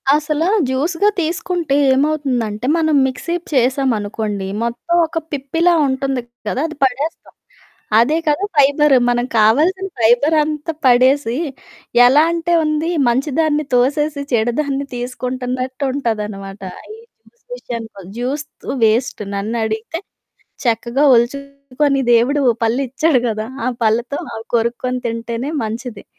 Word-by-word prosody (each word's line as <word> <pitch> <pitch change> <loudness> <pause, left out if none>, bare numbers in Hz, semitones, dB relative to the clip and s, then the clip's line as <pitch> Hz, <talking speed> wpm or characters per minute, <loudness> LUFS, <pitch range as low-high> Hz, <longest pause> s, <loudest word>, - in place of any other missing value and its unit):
అసలా 305 +2 0 0.2
జ్యూస్‌గా 330 +10 +1
తీసుకుంటే 335 -2 -1 0.2
ఏమవుతుందంటే, 260 -6 -1
మనం 315 -2 +2
మిక్సీప్ 335 +7 -4
చేసామనుకోండి, 220 -6 0 0.2
మొత్తం 240 +9 -2
ఒక 325 - -6
పిప్పిలా 325 +5 +1
ఉంటంది 265 -1 -1 0.3
కదా! 260 - -1
అది 320 - -9
పడేస్తాం. 270 +5 -2 0.7
అదే 295 +8 +3
కదా 300 +6 +1
ఫైబర్. 285 +1 +4 0.2
మనకు 245 +1 0
కావాల్సిన 315 - +3
ఫైబరంతా 300 +6 +2
పడేసీ, 255 0 +4 0.7
ఎలా 275 +5 +6
అంటే 340 0 -1
ఉంది, 305 +2 0 0.2
మంచి 265 +5 0
దాన్ని 305 -1 +1
తోసేసి 285 +4 +1
చెడు 235 +1 +2
దాన్ని 280 -1 -2
తీసుకుంటన్నట్టుంటదనమాట. 250 -5 -3 0.2
ఆహ్, - - -17
ఈ - - -14 0.3
జ్యూస్ 480 - -28
విషయానికొ 225 - -7
జ్యూస్ 265 +5 -2 0.2
త్ - - -11 0.2
వేస్ట్ 225 +2 +1
నన్నడిగితే 220 +6 -3 0.7
చక్కగా 235 +4 +1
ఒల్చుకొని 280 +2 0
దేవుడు 270 +5 +3 0.2
పళ్ళిచ్చాడు 265 +4 +1
గదా! 215 0 -3 0.2
ఆ - - +1 0.2
పళ్ళతో 235 +5 0 0.2
అవి 225 0 -7
కొరుక్కోని 245 +2 -1
తింటేనే 230 +4 -4
మంచిది. 225 0 -6
260 Hz, 110 wpm, -18 LUFS, 235-300 Hz, 0.7 s, ఎలా